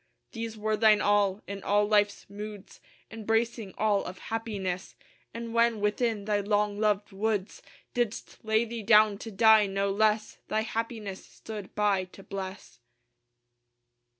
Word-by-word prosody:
These 225 -1 -5
were 215 0 0
thine 215 -1 +5
all: 205 -1 +2
in 200 0 -6
all 205 +1 +2
life's 205 -1 +2
moods 205 0 -9 0.3
Embracing 225 -1 -1
all 210 -2 +2
of 180 - -7 0.2
happiness: 195 -5 -3 0.4
And 230 0 -6
when 235 -1 +3
within 210 0 0
thy 210 -1 +1
long 205 0 0
loved 210 -1 +1
woods 210 - -2 0.3
Didst 240 -3 -3
lay 220 +1 +2
thee 230 0 -5
down 210 -1 +5
to 225 - -7
die, 220 0 +5
no 195 0 0
less 215 +1 +1
Thy 215 - 0
happiness 220 -3 -4
stood 210 -3 -9
by 205 -3 +2
to 190 +1 -15
bless. 190 -11 -7
210 Hz, 140 wpm, -28 LUFS, 200-220 Hz, 0.4 s, thine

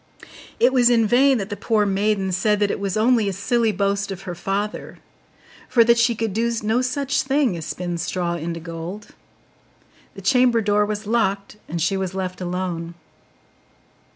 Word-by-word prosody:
It 250 +2 +4
was 245 -2 +5
in 230 -2 +3
vain 260 +4 +4
that 200 -1 -5
the - - -2
poor 215 0 +1
maiden 195 -1 0
said 210 +3 +1
that 205 -1 +1
it - - -3
was 195 0 -2
only 225 -2 +3
a - - -3
silly 225 +3 +1
boast 200 0 -1
of 195 0 -7
her 180 -2 -5
father, 195 +4 -4 0.7
for 235 - +5
that 235 +1 +4
she 235 0 +3
could 220 -2 -2
do 230 +3 0
no 220 +4 +1
such 275 +2 0
thing 270 -6 +1
as 165 -2 -6
spin 175 -1 -4
straw 175 0 -2
into 170 0 -4
gold: 170 +5 -7 1.1
the 195 - -9
chamber 250 +2 +4
door 205 0 +2
was 210 0 -4
locked, 205 -2 -1
and 170 - -3
she 195 +3 +1
was 190 -1 -3
left 185 -1 -4
alone. 175 -2 -4
205 Hz, 180 wpm, -22 LUFS, 185-230 Hz, 1.1 s, was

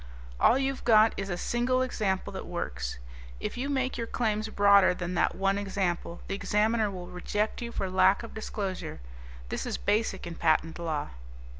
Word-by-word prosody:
"All 245 - +5
you've 270 0 -1
got 220 -1 +6
is 195 0 -4
a 175 - -2
single 250 +6 +1
example 200 -7 -1
that 190 - -6
works. 65 - -4 0.4
If - - -4
you 265 +3 -3
make 265 -2 -1
your 230 - -2
claims 220 -2 -1
broader 200 -3 +5
than 180 0 -4
that 175 - +1
one 195 +1 +1
example, 185 -4 -2
the - - -3
Examiner 215 +2 +1
will 185 -2 -6
reject 210 +6 -2
you 235 0 -4
for 195 - -2
lack 190 +3 +4
of 230 - -9
disclosure. 195 - -4 0.5
This - - -3
is - - -2
basic 205 -2 0
in 170 - -5
patent 160 0 +1
law. 160 -3 -2
200 Hz, 175 wpm, -29 LUFS, 180-225 Hz, 0.5 s, got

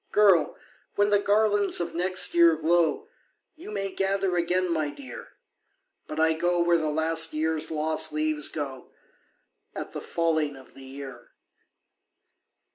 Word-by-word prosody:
Girl! 195 -6 +3 0.4
when 205 0 +2
the 205 - +4
garlands 205 0 +2
of 170 -1 -4
next 185 +2 +2
year 170 -1 +5
glow, 170 - +1 0.5
YOU 325 - -11
may 195 -2 -3
gather 195 -1 -1
again, 175 +1 0
my 155 -2 -1
dear 265 - -11 0.7
But 155 - -6
I 160 0 +3
go 175 +2 0
where 170 0 +3
the 155 -1 -2
last 160 +1 +1
year's 160 0 -1
lost 155 0 +1
leaves 155 0 -1
go 135 -4 -6 0.9
At - - -6
the - - -6
falling 160 -3 -1
of 130 -1 -16
the 135 - -13
year." 135 -2 -10
165 Hz, 140 wpm, -26 LUFS, 155-185 Hz, 0.9 s, year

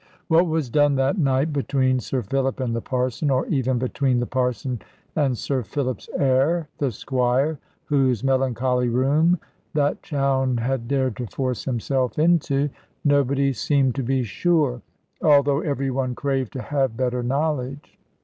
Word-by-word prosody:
What 170 +2 +4
was 155 -6 -1
done 145 0 +3
that 135 +8 +1
night 140 +1 +1
between 130 -2 +1
Sir 125 +1 -3
Philip 135 +5 -1
and 120 -3 -1
the 115 - -2
Parson, 130 +3 -1
or 130 -1 +1
even 130 -3 0
between 130 0 0
the 120 - 0
Parson 125 -1 -2 0.3
and 135 -5 +1
Sir 135 +1 -1
Philip's 130 +4 -4
heir, 140 +5 +2
the 140 -3 0
Squire 130 +6 0 0.3
(whose 130 -6 +1
melancholy 130 -2 +1
room 145 +8 +3 0.4
that 145 -1 +1
Chowne 135 -3 0
had 120 0 -2
dared 130 -3 0
to 125 - -4
force 130 +1 -3
himself 130 0 -1
into), 150 -3 +2 0.3
nobody 140 -1 +2
seemed 135 -1 +1
to 135 - -2
be 130 +1 0
sure, 140 - +1 0.4
although 145 -2 +4
every 140 -3 -1
one 130 -1 -1
craved 135 -3 -2
to 130 - -5
have 135 -5 -1
better 125 -1 0
knowledge. 140 +1 -2
135 Hz, 150 wpm, -23 LUFS, 125-145 Hz, 0.4 s, What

